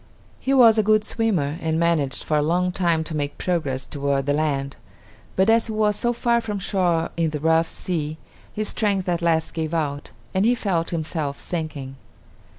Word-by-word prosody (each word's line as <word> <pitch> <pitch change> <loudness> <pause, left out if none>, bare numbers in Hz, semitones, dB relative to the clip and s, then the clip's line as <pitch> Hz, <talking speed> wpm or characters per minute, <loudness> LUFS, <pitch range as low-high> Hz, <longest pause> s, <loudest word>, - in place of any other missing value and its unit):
He 265 - -2
was 235 -5 +6
a - - +6
good 215 0 +3
swimmer, 180 -10 0
and 160 0 0
managed 165 -5 +1
for 155 - -1
a 150 - +3
long 180 +4 +1
time 170 -3 +1
to 160 0 -5
make 145 -1 -3
progress 145 -8 -1
toward 140 -2 -1
the 145 - +1
land; 140 -2 -1 0.6
but 190 +1 +3
as 225 +1 +4
he 220 - -4
was 210 -1 +2
so 240 +3 0
far 235 0 +1
from 210 -3 -4
shore 180 -4 0
in 165 -1 +1
the 150 -1 -4
rough 160 +2 +2
sea, 155 -4 -3 0.3
his 215 0 -2
strength 200 -4 0
at 175 -1 0
last 165 -1 +1
gave 160 0 -2
out 145 -3 -2 0.2
and 190 0 +2
he 240 +3 +4
felt 180 -7 -1
himself 155 -3 -3
sinking. 155 -6 -5
165 Hz, 190 wpm, -23 LUFS, 150-200 Hz, 0.6 s, was